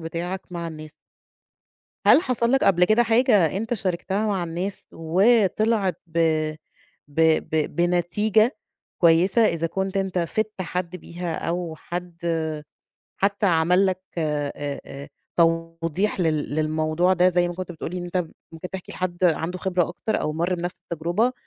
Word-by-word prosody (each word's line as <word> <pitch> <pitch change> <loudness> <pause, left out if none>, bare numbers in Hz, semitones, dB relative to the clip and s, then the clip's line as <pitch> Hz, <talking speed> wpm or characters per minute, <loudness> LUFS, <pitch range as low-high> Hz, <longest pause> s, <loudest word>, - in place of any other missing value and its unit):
بتاعك 170 +3 -4
مع 170 -1 -4
الناس. 155 -1 -9 1.1
هل - - +8
حصل 240 -3 0
لك 270 - +3
قبل 180 -2 +5
كده 215 +5 +4
حاجة 225 - +3
أنت 225 +4 -1
شاركتها 190 +1 -1
مع 195 -4 0
الناس 175 +4 -4
وطِلعِت 200 +2 +2
ب 165 0 -4 0.9
ب 145 +3 -2 0.3
ب 155 -1 0
بنتيجة 195 - +2 0.4
كويسة 175 +6 +4
إذا 165 -5 +1
كنت 190 +3 -3
أنت 190 -2 -1
فِدت 210 +3 -2
حد 180 0 -4
بيها 175 -1 -5
أو 170 -1 -2
حد 170 -1 -3 0.7
حتّى 200 +1 +1
عمل 180 +2 +3
لك 185 -1 -1 0.2
آآ 150 -2 -1 0.3
آآ 140 +1 -9 0.3
توضيح 165 +3 +1
لل 155 -4 0
للموضوع 155 +3 +1
ده 180 0 +4
زي 175 -1 +2
ما 175 - -5
كنت 180 0 -6
بتقول 160 - -6
لي 180 - -4
إن 175 - -5
أنت 175 +1 -4 0.4
ممكن 165 +2 -7
تحكي 190 -2 -7
لحد 180 0 -2
عنده 170 +1 +1
خبرة 180 -2 0
أكتر 210 +5 -2
أو 150 - -1
مَر 170 +4 0
بنَفْس 175 +1 -4 0.2
التجربة، 175 +10 +1
175 Hz, 150 wpm, -24 LUFS, 165-195 Hz, 1.1 s, هل